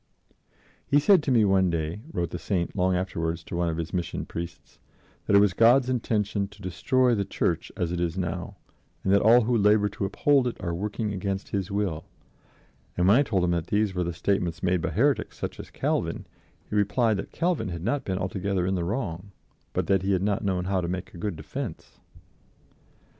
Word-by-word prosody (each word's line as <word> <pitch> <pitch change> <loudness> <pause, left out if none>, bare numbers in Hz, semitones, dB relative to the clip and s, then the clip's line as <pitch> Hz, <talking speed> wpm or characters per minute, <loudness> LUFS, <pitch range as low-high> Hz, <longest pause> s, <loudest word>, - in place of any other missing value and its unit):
"He 140 - +4
said 180 +4 +5
to 145 - -1
me 115 -4 +5
one 95 -2 +3
day," 80 +2 -2
wrote 85 - -2
the 90 - -4
Saint 90 -3 -2
long 90 -1 +2
afterwards 85 -3 -2
to - - -7
one 85 0 +1
of 80 - -3
his 85 0 -4
Mission 90 -2 -2
Priests, 85 0 -8 0.5
"that 100 - +4
it - - +8
was 100 -2 +4
God's 125 +4 +5
intention 105 -4 0
to 100 - -17
destroy 125 +7 +2
the 100 -3 +1
Church - - -1
as 85 -1 -1
it 90 - -2
is 85 0 -1
now, 90 +2 -3 0.5
and 95 - +2
that 100 - +5
all 115 +3 +6
who 120 +2 +1
labor 105 -1 +4
to 100 - -3
uphold 135 +6 +2
it 120 - -4
are 85 -2 -3
working 105 +4 -3
against 95 0 -3
His 95 -3 -2
will; 100 -6 -2 0.9
and 90 0 +3
when 105 +5 +6
I - - +5
told 100 -10 0
him 90 - +2
that 85 -1 -1
these 105 -1 +1
were 90 -1 -1
the 85 - -2
statements 85 -1 -1
made 90 -1 +2
by - - -1
heretics 140 +6 +1
such - - -5
as - - -8
Calvin, - - -2 0.4
he - - -5
replied 105 +2 +2
that 95 - -6
Calvin 165 - 0
had 85 -1 -5
not 135 +7 0
been 95 -1 -2
altogether 95 0 -1
in 95 - 0
the 90 -2 -1
wrong, 95 -2 -3 0.4
but - - -1
that 95 -1 +2
he 95 +1 +1
had 95 0 +1
not 105 +2 0
known 90 -2 0
how 95 -1 0
to 85 - -3
make 90 +1 -5
a 85 - -10
good 100 -1 -2
defense." 75 -1 -7
95 Hz, 210 wpm, -26 LUFS, 90-105 Hz, 0.9 s, it